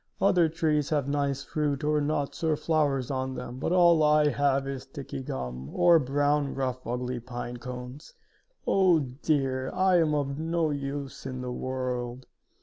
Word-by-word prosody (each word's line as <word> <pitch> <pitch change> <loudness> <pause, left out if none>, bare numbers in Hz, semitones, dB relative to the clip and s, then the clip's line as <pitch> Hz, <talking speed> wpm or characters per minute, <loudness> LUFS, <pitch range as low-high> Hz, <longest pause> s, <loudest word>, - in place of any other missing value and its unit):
Other 180 -4 +4
trees 155 -2 0
have 145 -3 0
nice 140 -1 -1
fruit 150 -1 -2
or 150 0 +2
nuts 145 +1 -2
or 160 -2 +2
flowers 145 -4 0
on 130 0 -2
them, 125 0 -6
but 140 - -1
all 170 -3 +5
I 150 0 +4
have 140 -1 +1
is 135 -1 -4
sticky 135 0 -7
gum, 65 - -5
or 170 -2 +6
brown, 145 +1 +1
rough 130 -1 -3
ugly 125 +1 -2
pine 120 0 -6
cones. 125 +3 -8 0.5
Oh, 185 -5 +4
dear! 130 0 -1
I 185 -1 +3
am 155 -2 +2
of 140 -1 -2
no 165 -1 0
use 140 -1 -5
in 130 -1 -5
the 125 0 -4
world!" 125 -1 -3
140 Hz, 160 wpm, -28 LUFS, 130-150 Hz, 0.5 s, or